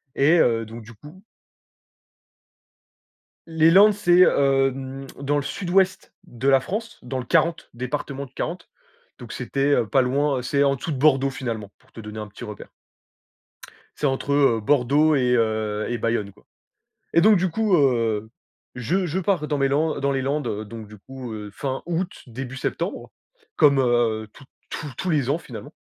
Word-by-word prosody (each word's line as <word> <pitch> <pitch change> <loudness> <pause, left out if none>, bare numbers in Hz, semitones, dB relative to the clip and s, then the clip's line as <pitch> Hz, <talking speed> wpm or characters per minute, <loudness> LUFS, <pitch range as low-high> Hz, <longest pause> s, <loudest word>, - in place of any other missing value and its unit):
et 160 +5 +4
heu, 115 -4 +2
donc 115 +2 -9
du 115 +2 -13
coup 150 - -15 2.2
Les 160 0 +3
Landes 205 +3 +7
c'est 180 -3 +3
hem, 135 -2 +2
dans 145 +1 0
le - - 0
sud-ouest 185 +4 0
de 120 +3 -4
la 135 -1 +6
France, 220 - -5
dans 130 +1 -4
le 125 - -6
40, 165 +6 +1
département 135 +3 -4
du 130 - -19
40. 170 +6 -5 0.5
Donc - - -9
c'était, 140 +1 0
heu, 120 -5 +2
pas 135 - +3
loin, 135 +2 +1
heu - - -4
c'est 140 +3 +1
en 140 -1 +2
dessous 150 +5 -5
de 140 - -2
Bordeaux, 135 -1 +3
finalement, 115 -7 -5
pour 130 - -29
te - - -12
donner 105 0 -8
un 105 - -6
petit 105 - -12
repère. 105 -3 -9 1.3
C'est - - -2
entre, 135 +1 -1
heu, 135 -6 +3
Bordeaux 145 +5 +3
et 125 -2 +2
heu, 110 -2 0
et 120 - -1
Bayonne, 115 -3 -1
quoi. 100 - -25 0.7
Et 170 - +6
donc 210 +4 +6
du 185 0 0
coup, 215 +2 +1
heu, 115 -7 +1 0.4
je 175 +10 -1
je 170 +3 -2
pars 180 -5 0
dans 145 - -1
mes 135 0 +2
Lan 155 +3 0
dans 140 0 +1
les 135 - -1
Landes 130 -6 -2
donc 110 -2 -9
du 105 - -13
coup, 130 +2 -9
heu, 105 -1 -7
fin 135 +2 -4
août, 175 +1 -2 0.2
début 130 +2 -7
septembre, - - -4 0.5
comme, 140 -2 +5
heu, 120 -3 +1
toutes 140 - -17 0.2
tous 145 -2 -6
tous 185 - -2
les 140 -5 +1
ans, 150 - +1
finalement, - - -10
135 Hz, 180 wpm, -23 LUFS, 120-155 Hz, 2.2 s, Landes